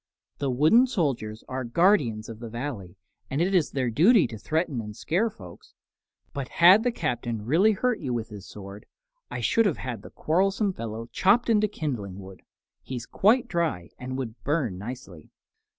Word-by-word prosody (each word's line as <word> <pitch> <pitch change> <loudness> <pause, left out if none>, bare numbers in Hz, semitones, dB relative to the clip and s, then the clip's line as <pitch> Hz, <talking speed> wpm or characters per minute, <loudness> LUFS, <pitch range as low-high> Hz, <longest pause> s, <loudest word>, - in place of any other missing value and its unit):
"The 140 - -1
wooden 155 - +5
soldiers 135 - -2
are 130 0 -3
guardians 120 - +2
of 115 -1 -9
the 115 -1 -7
Valley, 110 -7 -6 0.3
and 135 - -2
it 180 +4 +1
is 175 -5 +3
their 130 -3 -1
duty 185 - +5
to 110 - -7
threaten 155 - -1
and 105 -1 -8
scare 195 - 0
folks. 90 - -14 0.6
But 140 -2 -4
had 180 +5 +6
the 245 +1 +1
Captain 120 - -3
really 180 - +4
hurt 245 +3 0
you 135 -5 -4
with 115 -2 -3
his 105 -2 -10
sword, 100 0 -10 0.4
I - - -5
should 230 -2 +3
have 175 - -1
had 120 -5 -5
the - - -11
quarrelsome 195 +4 0
fellow 115 -5 -6
chopped 230 +5 +3
into 215 -1 +3
kindling 120 - -4
wood. 95 -1 -11 0.4
He's 125 -3 -6
quite 230 +5 +3
dry 160 - -2
and 130 +1 -5
would 125 -3 -6
burn 135 - -1
nicely." 100 - -9
130 Hz, 175 wpm, -26 LUFS, 110-185 Hz, 0.6 s, had